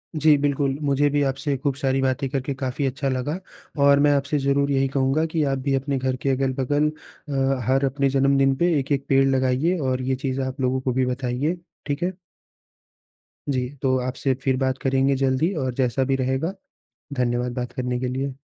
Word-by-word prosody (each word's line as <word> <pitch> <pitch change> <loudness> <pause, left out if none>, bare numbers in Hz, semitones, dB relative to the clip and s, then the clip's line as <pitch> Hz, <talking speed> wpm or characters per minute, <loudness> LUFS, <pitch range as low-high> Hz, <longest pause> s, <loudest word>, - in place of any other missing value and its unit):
जी, 155 -1 +5
बिल्कुल। 140 -1 0
मुझे 145 0 +2
भी 145 0 +1
आपसे 140 +1 -1
खूब 140 0 -1
सारी 135 -1 0
बातें 135 +1 0
करके 135 0 -2
काफ़ी 130 +1 -2
अच्छा 135 +1 -1
लगा 130 +6 -2 0.4
और 140 0 +6
मैं 145 0 +4
आपसे 140 +2 0
ज़रूर 140 +1 +1
यही 135 0 +2
कहूँगा 135 +3 +1
कि 160 -2 +2
आप - - -1
भी 135 +1 -1
अपने 135 +1 -1
घर 130 0 -1
के 135 - 0
अगल-बगल 135 +2 +1 0.4
अ, 135 -1 +1
हर 135 +1 +3
अपने 135 +1 +1
जन्मदिन 135 0 +3
पे 170 +4 +2
एक-एक 140 0 -1
पेड़ 135 0 +5
लगाइए 135 +6 +1
और 130 -3 -1
ये 130 +1 0
चीज़ 135 0 -2
आप 130 +1 -4
लोगों 130 0 +1
को 130 - -1
भी 130 +1 +1
बताइए। 125 +6 -1 0.3
ठीक 145 +3 -2
है? 185 +1 -1 1.3
जी। 130 -2 0
तो 130 -1 +2
आपसे 130 +2 -1
फिर 130 -2 +1
बात 130 0 0
करेंगे 135 +1 +2
जल्द 130 -1 +1
ही 170 +5 +2
और 130 -1 -2
जैसा 125 0 +1
भी 135 +1 +1
रहेगा 130 +8 -1 0.6
धन्यवाद 125 -1 -1
बात 125 -1 -4
करने 125 -1 -2
के 125 - -2
लिए। 135 +1 -3
135 Hz, 195 wpm, -23 LUFS, 130-140 Hz, 1.3 s, और